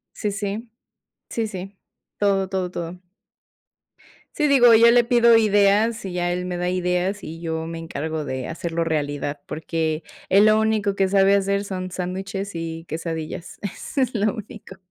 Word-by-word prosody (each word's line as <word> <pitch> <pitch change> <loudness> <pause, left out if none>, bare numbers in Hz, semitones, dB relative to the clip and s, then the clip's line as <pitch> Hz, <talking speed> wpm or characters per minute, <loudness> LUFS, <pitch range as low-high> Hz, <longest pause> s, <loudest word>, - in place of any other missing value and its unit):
Sí, 210 - -2
sí. 205 +3 -4 0.6
Sí, 230 -1 -1
sí. 195 -1 -8 0.4
Todo, 195 -2 +2
todo, 185 -2 -2
todo. 175 0 -6 1.4
Sí, 300 - +2
digo, 255 -5 +6
yo 230 +1 +7
le 245 0 +6
pido 235 -1 +5
ideas 215 +1 +3
y 190 - -4
ya 175 0 -1
él 180 +1 -2
me 180 -1 -3
da 180 0 -1
ideas 180 +2 -1
y 165 +1 -8
yo 160 -1 -3
me 165 0 -5
encargo 160 -1 -4
de 130 -2 -4
hacerlo 170 0 -2
realidad, 145 -2 -2
porque 160 0 -2 0.2
él 200 +3 +6
lo 215 0 +5
único 215 -2 +1
que 195 -1 +1
sabe 195 0 +4
hacer 200 0 +1
son 185 -2 -5
sándwiches 190 +2 -4
y 165 0 -5
quesadillas. 165 +1 -5
Eso 210 - -4
es 255 -1 -1
lo 215 0 +1
único. 215 -3 -10
190 Hz, 165 wpm, -23 LUFS, 165-210 Hz, 1.4 s, yo